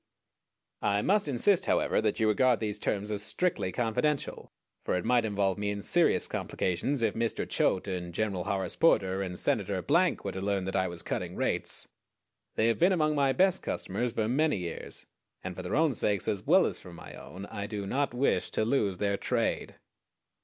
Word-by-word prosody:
I 100 0 +1
must 205 -3 +2
insist, 170 +8 +2
however, - - +2
that 110 -1 0
you 110 - +3
regard 120 +3 +3
these 105 -1 -3
terms 105 0 -2
as 105 -1 -2
strictly 135 - -1
confidential; 125 +6 -1 0.3
for - - 0
it 90 - -2
might 120 -1 +3
involve 100 -2 0
me 105 0 -1
in 100 0 -4
serious - - +3
complications 115 +9 -1
if 110 -3 +2
Mr. 115 0 -1
Choate, 95 - +1
and 90 -2 -4
Gen. 105 +5 -1
Horace 95 0 -2
Porter, 95 - +3
and 90 -2 -4
Senator 95 +1 0
Blank 170 - +2
were 100 - -1
to 95 - -5
learn 100 -1 -1
that 95 - -3
I 95 -1 +2
was 85 -1 -5
cutting - - -3
rates. - - -1 0.7
They 110 - +2
have 115 - +1
been 175 +3 +5
among 155 -3 +2
my 140 -2 +2
best 190 +7 +2
customers 115 +5 -3
for 110 -1 0
many 150 +3 +2
years, 85 -3 -5 0.4
and 90 -1 -5
for 95 - -6
their 90 +3 -3
own 155 -1 +3
sakes, 105 -4 0
as 100 - -2
well - - +6
as - - -3
for 90 - -12
my - - -11
own, 95 +3 -9
I 100 -1 -5
do 105 -2 -4
not 135 +7 0
wish 125 +3 +1
to 110 - +1
lose 105 -7 +1
their 100 0 0
trade. - - -1
105 Hz, 195 wpm, -29 LUFS, 95-130 Hz, 0.7 s, well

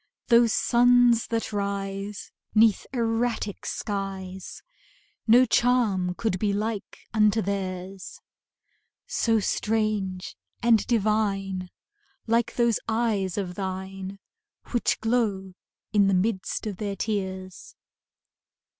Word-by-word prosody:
Those 235 -1 +6
suns 245 0 +4
that 225 -1 -2
rise 200 0 -3 0.2
'Neath 220 -2 +4
erratic 230 -3 -1
skies, 190 -2 -5 0.6
No 245 +3 +7
charm 220 -7 +2
could 220 -4 -1
be 205 0 +1
like 210 0 -3 0.2
unto 215 0 +4
theirs 190 -1 -4 0.9
So 225 -1 +1
strange 210 -3 -1 0.3
and 230 -3 +4
divine, 200 -4 0 0.6
Like 230 0 +1
those 235 -2 +2
eyes 220 -5 0
of 185 -3 -2
thine 190 +1 -5 0.5
Which 240 - +1
glow 215 -5 0 0.4
in 200 -2 +5
the 195 - +3
midst 190 +2 -1
of 205 -4 -4
their 200 -1 -3
tears. 190 -3 -4
205 Hz, 100 wpm, -26 LUFS, 190-225 Hz, 0.9 s, No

